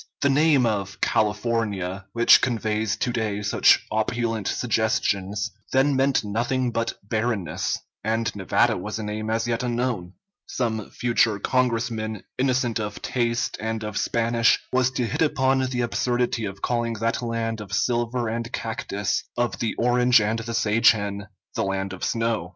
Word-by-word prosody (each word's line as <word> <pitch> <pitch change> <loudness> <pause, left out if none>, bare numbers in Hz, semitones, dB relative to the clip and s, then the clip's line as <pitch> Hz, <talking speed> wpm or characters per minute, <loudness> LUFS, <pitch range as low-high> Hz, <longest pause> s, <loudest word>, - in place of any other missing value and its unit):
The 140 - +3
name 145 -2 +4
of 100 -3 -2
California, 105 -3 0
which 120 0 +6
conveys 110 -3 0
to 125 - -1
day 105 -3 -2
such 100 - +4
opulent 110 -1 -1
suggestions, 105 -4 0 0.2
then 135 +1 +3
meant 135 -1 +2
nothing 120 +4 0
but 115 0 -2
barrenness, 110 -7 -1 0.3
and 110 +1 -1
Nevada 95 -2 +2
was 105 +4 -4
a 110 - -4
name 105 +1 -4
as 115 +1 0
yet 120 +1 0
unknown; 120 -7 -2 0.3
some 110 -4 -2
future 115 -2 +1
Congressman, 115 -2 -1 0.2
innocent 125 -3 +1
of 105 -1 -5
taste 120 -2 -1
and 110 0 -3
of 105 -1 -5
Spanish, 115 +2 +2
was 130 0 +3
to 130 -1 -2
hit - - -3
upon 135 -3 +2
the 125 -1 -1
absurdity 120 -1 0
of 95 -1 -7
calling 120 -1 0
that 115 +2 -1
land 115 -2 -2
of 105 - -9
silver 120 0 0
and 115 +1 -3
cactus, 110 -3 -2
of 120 -1 -1
the 115 - -1
orange 125 0 +4
and 110 +2 0
the 115 0 -4
sage 110 +1 +4
hen, 100 -1 -1 0.3
the - - -1
land 95 0 -2
of 95 - -8
snow. 115 -6 -1
115 Hz, 155 wpm, -24 LUFS, 105-120 Hz, 0.3 s, which